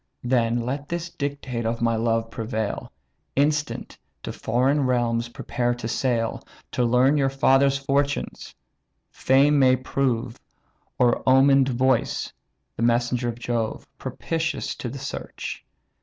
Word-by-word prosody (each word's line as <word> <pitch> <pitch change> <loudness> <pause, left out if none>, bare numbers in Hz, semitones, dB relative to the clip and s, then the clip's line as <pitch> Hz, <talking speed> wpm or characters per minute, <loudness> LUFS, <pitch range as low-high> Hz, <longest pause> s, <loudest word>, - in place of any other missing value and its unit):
Then 120 -1 +2
let 140 +4 -4
this 170 0 -3
dictate 140 -6 -4
of 115 +1 -1
my 115 -1 +1
love 115 0 0
prevail: 110 -2 -3 0.4
Instant, 150 +1 0 0.2
to - - -4
foreign 130 +4 +1
realms 120 -2 0
prepare 120 0 -2
to 120 -2 -5
sail, 115 -1 -1 0.3
To 125 - 0
learn 125 +5 +4
your 135 -2 +2
father's 135 0 +3
fortunes; 140 +1 -2 0.6
Fame 140 +2 +3
may 130 -1 +5
prove, 125 -2 -1 0.6
Or 120 -1 +3
omen'd 135 0 +5
voice 130 0 0 0.4
(the - - -6
messenger 120 +1 +1
of 115 - -5
Jove), 120 -2 -2
Propitious 160 -1 -3
to 125 - -4
the 135 - -7
search. 140 +1 -6
125 Hz, 125 wpm, -24 LUFS, 115-140 Hz, 0.6 s, may